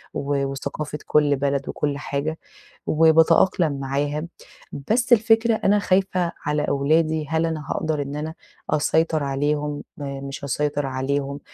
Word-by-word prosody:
وثقافة 140 +2 -3
كُلّ 150 -1 +3
بلد، 140 0 -1
وكُلّ 145 -1 -2
حاجة، 145 +2 -3 0.5
وباتأقلم 160 -1 +4
معاها، 145 +3 -2 0.6
بس 245 +2 +2
الفكرة 225 0 +4
أنا 210 -1 +2
خايفة 185 -3 +1
على 150 0 +1
أولادي، 155 +2 +1
هل 160 +1 +1
أنا 155 -3 -3
هاقدر 155 -2 -1
إن 140 +1 -5
أنا 155 +2 -4 0.4
أسيطر 160 +1 +1
عليهم، 145 +1 -1
م 140 -1 -6
مش 135 - -7
هاسيطر 145 0 -1
عليهم، 140 +2 -2
150 Hz, 125 wpm, -23 LUFS, 140-160 Hz, 0.6 s, وباتأقلم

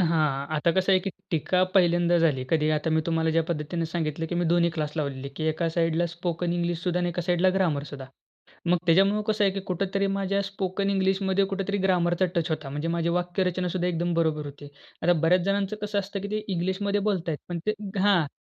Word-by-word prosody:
हां. 155 -5 +1
आता 155 +3 +2
कसं 190 +2 +2
आहे, 190 - +6
की 195 +1 -3 0.2
टीका 180 +2 +1
पहिल्यांदा 175 -2 +4
झाली. 150 -6 +2
कधी, 155 -2 +2
आता 155 +1 0
मी 160 0 +3
तुम्हाला 160 -1 +1
ज्या 165 +1 +2
पद्धतीने 165 +1 -2
सांगितलं, 160 -1 -2
की 175 - -4
मी 175 0 +1
दोन्ही 170 0 +3
क्लास 155 -2 -3
लावलेली 140 -4 -2
आहे, 140 - -5
की 155 - -3
एका 160 +2 0
साइडला 165 +1 +1
स्पोकन 170 0 -3
इंग्लिश 175 -1 -1
सुद्धा 180 0 0
आणि 175 - 0
एका 175 0 -3
साइडला 180 +1 +2
ग्रामर 170 -7 +1
सुद्धा. 135 -2 -8 0.6
मग 175 +1 +4
त्याच्यामुळे 195 +5 +4
कसं 215 -1 +2
आहे, 195 - +4
की 195 - -3
कुठेतरी 195 +1 -1
माझ्या 195 0 0
स्पोकन 195 0 -2
इंग्लिशमध्ये 190 0 +1
कुठेतरी 195 +1 -2
ग्रामरचा 180 -1 +2
टच 170 -3 0
होता. 155 -3 -3
म्हणजे 145 +4 -3
माझी 170 0 0
वाक्यरचना 180 +1 0
सुद्धा 180 0 -1
एकदम 175 0 -1
बरोबर 160 -2 0
होती. 145 0 -10 0.3
आता 175 +2 +4
बऱ्याच 170 +2 +3
जणांचं 200 +1 0
कसं 210 0 -1
असतं, 200 0 -3
की 200 - -5
ते 215 0 -2
इंग्लिशमध्ये 190 +3 0
बोलतायत, 180 -7 -1
पण 175 -1 -3
ते 215 - +3 0.3
हां, 190 -5 +4
175 Hz, 210 wpm, -26 LUFS, 165-190 Hz, 0.6 s, आहे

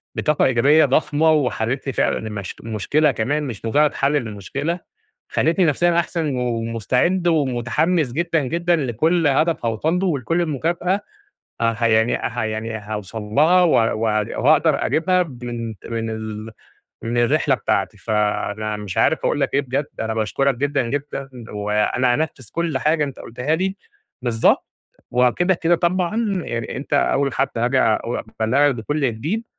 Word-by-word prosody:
بطاقة 150 -1 +1
إيجابية 140 +5 +4
ضخمة، 150 +3 +2
وحليت 135 -3 0
لي 135 - -1
فعلًا - - +1
الم 105 -2 -5 0.2
المشكلة 115 +8 +1
كمان 145 +7 -1
مش 120 -7 -6
مجرد 145 +6 +3
حل 140 +1 +1
للمشكلة. 140 - -3 0.5
خليتني 170 +3 +2
نفسيًا 170 +3 +2
أحسن، 160 -5 -2
ومستعد 125 - 0
ومتحمّس 145 +1 +1
جدًا 165 +1 0
جدًا 170 +6 +1
لكل 155 +4 +1
هدف 155 0 +1
هأوصل 135 +10 0
له، 190 - 0
ولكل 165 +2 0
المكافأة، 170 +5 0 0.6
أ 115 0 +1
يعني 110 +1 +3
ح 120 - -4
يعني 110 0 -2
هاوصل 105 0 -6
لها 155 +12 +4
واق 115 -10 +3 0.5
وهأقدر 155 +4 +3
أجيبها 180 +2 +2
من 120 -6 -6 0.2
من 115 -1 -3
ال 110 0 -6 0.5
من 120 +1 -2
الرحلة 120 -1 +3
بتاعتي. - - -1
فأنا 105 0 -1
مش 105 -3 -5
عارف - - +3
أقول - - +1
لك - - -1
إيه 140 - +4
بجد، 140 +2 -2
أنا 110 0 -2
باشكرك 120 +5 +1
جدًا 140 +1 0
جدًا، 140 0 -4 0.2
وأنا 105 +4 +1
هانفذ 140 -6 -3
كل 165 -4 -1
حاجة 150 +2 +2
أنت 140 -2 -7
قلتها 125 +6 -2
لي 190 +3 -1 0.5
بالضبط، 115 -2 +2 0.4
وكده 125 +10 +2
كده 170 0 +2
طبعًا 180 +3 0 0.3
يعني 115 -1 -4
أنت 140 - -8
أوّل 140 -1 +2
حد - - +1
هاجي 120 +3 +1
اق 110 - +2 0.4
أبلغك 140 +5 +3
بكل 145 +7 -3
جديد 165 - -3
135 Hz, 145 wpm, -21 LUFS, 115-160 Hz, 0.6 s, إيجابية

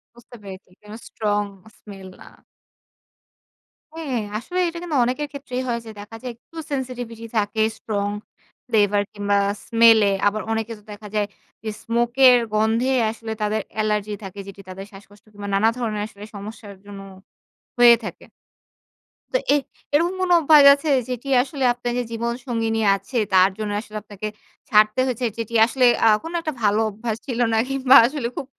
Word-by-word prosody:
বুঝতে 240 +1 -15
পেরেছি। 190 -1 -10
কোনো 210 +1 -11
স্ট্রং 210 -2 -1 0.4
স্মেল 195 -2 -12
না। - - -13 1.7
হ্যাঁ। 280 -7 -2 0.2
আসলে 360 +10 -4
এটা 340 0 -5
কিন্তু 335 -4 -3
অনেকের 260 +5 -2
ক্ষেত্রেই 270 -3 -5
হয়। 235 -1 -1
যে 220 - -8
দেখা 210 +2 -10
যায় 250 -1 -5
একটু 235 +7 -26 0.2
sensetivity 245 -4 -5
থাকে 210 +1 0 0.2
স্ট্রং 205 -2 -2 0.6
ফ্লেভার 205 -3 +2
কিংবা 205 -1 0 0.3
স্মেল 230 -1 +6
এ। - - +1 0.2
আবার 215 +1 0
অনেকে 225 0 -2
তো - - -23
দেখা 210 +1 -10
যায় 210 -1 +1 0.4
যে 220 - -3
স্মোক 235 +1 0 0.2
এর 250 -1 +8 0.2
গন্ধে 220 +4 +1 0.2
আসলে 225 0 -8
তাদের 215 +1 0 0.2
এলার্জি 210 -1 -1
থাকে 195 +1 -8
যেটি 195 0 -10
তাদের 190 +1 -8
শ্বাসকষ্ট 200 +1 -16
কিংবা 205 0 -8
নানা 215 +3 +4
ধরণের 220 -4 -2
আসলে 205 -1 -13
সমস্যার 205 0 -9
জন্য 200 -1 -10 0.8
হয়ে 240 -1 +8
থাকে। - - -8 1.1
তো - - +3 0.2
এ - - +5 0.4
এরকম 340 +5 +2
কোন 370 -1 0
অভ্যাস 305 -2 +6
আছে 285 +2 -3 0.2
যেটি 250 +2 -5
আসলে 270 +1 -4
আপনার 245 0 -4
যে 245 - 0
জীবন 235 +1 -2
সঙ্গীনি 225 -3 -1 0.2
আছে 195 +6 -6 0.2
তার 185 0 +6
জন্য 215 -1 -3
আসলে 215 -1 -9
আপনাকে 210 0 -7 0.4
ছাড়তে 215 +2 +4
হয়েছে। 250 -1 -2
যেটি 230 0 -5
আসলে 250 +2 +1 0.2
আ - - +7 0.2
কোন 325 - -6
একটা 310 -2 -3
ভালো 210 +1 +3
অভ্যাস 220 +1 -4
ছিল 245 -3 -3
না। - - +2
কিংবা 270 -1 +4
আসলে 265 -1 -2
খুব - - -4
225 Hz, 165 wpm, -22 LUFS, 210-250 Hz, 1.7 s, এর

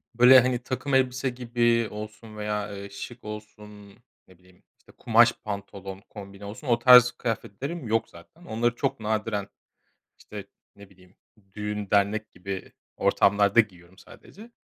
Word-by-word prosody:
böyle, 125 +2 +8
hani, 125 0 0
takım 130 +1 -4
elbise 130 0 +2
gibi 120 -2 +1
olsun 105 +1 -9
veya, 105 0 -3
ııı, 100 0 -8
şık 120 +5 -9
olsun, 105 -1 -10 0.4
ne 95 -2 -20
bileyim, 90 0 -25 0.2
işte, - - -21
kumaş - - +4
pantolon 100 -2 -7
kombini 100 -1 -11
olsun, 120 +7 -9
o 120 -1 +2
tarz 125 0 +8
kıyafetlerim 125 - -5
yok 115 0 0
zaten. 85 - -17
Onları 115 +2 0
çok - - -2
nadiren, 105 -2 -2 0.7
işte, 100 -2 -10 0.3
ne 100 -1 -15
bileyim, 90 0 -22 0.4
düğün 105 -1 -4
dernek 105 +2 +1
gibi 95 +1 -7 0.2
ortamlarda 100 +2 +4
giyiyorum 95 -3 -7
sadece. 220 +4 -15
105 Hz, 140 wpm, -26 LUFS, 100-120 Hz, 0.7 s, böyle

